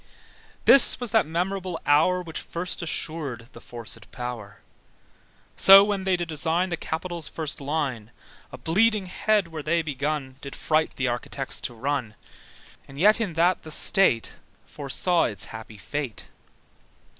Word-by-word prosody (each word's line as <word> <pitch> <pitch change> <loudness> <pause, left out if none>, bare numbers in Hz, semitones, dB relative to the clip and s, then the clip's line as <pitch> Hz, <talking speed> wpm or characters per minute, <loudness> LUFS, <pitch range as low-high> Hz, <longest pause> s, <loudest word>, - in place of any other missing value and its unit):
This 275 - +7
was 245 -4 -4
that 220 -8 +3
memorable 180 +1 -2
hour 170 +5 +3
Which 160 -2 -5
first 180 +2 -5
assured 145 -8 -4
the - - -11
forcèd 120 -2 -8
power. 120 -5 -7 1.0
So 195 +1 +9
when 200 -2 -2
they 190 -1 +2
did 175 -1 -3
design 165 +3 0
The 170 - -1
Capitol's 165 0 -5
first 155 -1 -5
line, 135 -6 -3 0.4
A - - -8
bleeding 210 +4 +2
head 205 0 0
where 160 -2 -6
they 165 +3 0
begun, 145 -2 -3
Did 140 - -8
fright 155 0 0
the 130 - -1
architects 125 +2 -4
to 120 - -4
run; 130 -3 -3 0.7
And 135 +1 -11
yet 210 +6 +5
in 200 -6 -2
that 175 +3 +2
the 155 - -11
State 150 -6 +3 0.3
Foresaw 160 +5 0
its 105 -1 -1
happy 110 -1 -9
fate. 135 +3 -5
160 Hz, 145 wpm, -25 LUFS, 135-180 Hz, 1.0 s, So